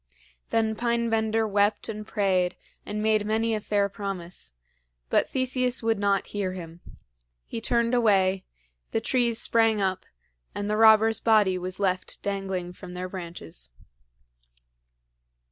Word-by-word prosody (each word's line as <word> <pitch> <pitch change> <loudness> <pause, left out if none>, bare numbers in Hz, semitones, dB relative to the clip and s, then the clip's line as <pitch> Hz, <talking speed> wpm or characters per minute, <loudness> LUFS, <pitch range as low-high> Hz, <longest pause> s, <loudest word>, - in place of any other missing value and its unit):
Then 220 -1 +1
Pine 235 0 0
bender 220 0 +1
wept 205 +1 +1
and 215 -1 -6
prayed 185 -4 +1 0.3
and 210 +1 -3
made 215 -1 +3
many 220 +2 0
a 215 - -1
fair 205 -1 +1
promise; 190 - -6 0.6
but - - +3
Theseus 255 -2 0
would 225 -2 +1
not 200 -1 +1
hear 195 -3 -1
him. 170 -2 -9 0.7
He 225 - -5
turned 235 +1 +1
away, 195 -5 +3 0.5
the - - +2
trees 235 -1 +1
sprang 225 -2 +3
up, 190 -2 -1 0.5
and 205 - -3
the 210 - 0
robber's 220 0 +6
body 215 -5 +4
was 185 +1 -5
left 185 -2 -1
dangling 190 -3 -3
from 180 -1 -10
their 180 +1 -4
branches. 170 - -7
210 Hz, 135 wpm, -26 LUFS, 185-225 Hz, 0.7 s, robber's